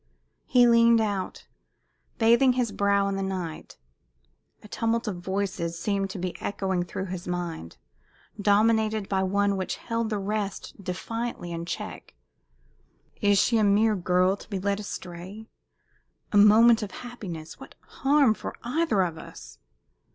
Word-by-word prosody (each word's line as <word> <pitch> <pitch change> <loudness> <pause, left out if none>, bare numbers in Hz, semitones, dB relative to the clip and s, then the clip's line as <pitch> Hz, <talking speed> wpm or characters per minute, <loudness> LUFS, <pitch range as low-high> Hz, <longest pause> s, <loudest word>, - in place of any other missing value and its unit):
He 245 -1 +5
leaned 235 0 +5
out, 205 -4 -3 0.7
bathing 235 +3 +5
his 245 -3 -1
brow 200 0 +2
in 195 0 -2
the - - -2
night. 185 -4 -5 0.9
A - - -11
tumult 230 +2 -1
of 195 -4 -3
voices 185 -2 -3
seemed 195 +1 -1
to 190 - -6
be 180 0 -4
echoing 190 -2 -1
through 185 +2 -5
his 185 -1 -6
mind, 175 - -5 0.6
dominated 215 0 +2
by 190 -1 0
one 200 +1 +1
which 185 - -3
held 230 -1 -3
the 215 - -1
rest 200 0 -4
defiantly 205 +1 -4
in 170 0 -5
check. 175 - -6 1.1
"Is 205 -1 +4
she 230 +3 +3
a - - +3
mere 210 +2 +3
girl, 180 +1 +2
to - - -15
be 200 - -3
'led 200 +2 -1
astray'? 190 +1 -8 0.9
A 205 - +2
moment 225 +3 +7
of 210 - -4 0.2
happiness 175 -10 -8
what - - -12
harm? 275 -4 +2
for - - -7
either 240 - +1
of 165 -3 -4
us?" - - -12
200 Hz, 145 wpm, -26 LUFS, 185-225 Hz, 1.1 s, moment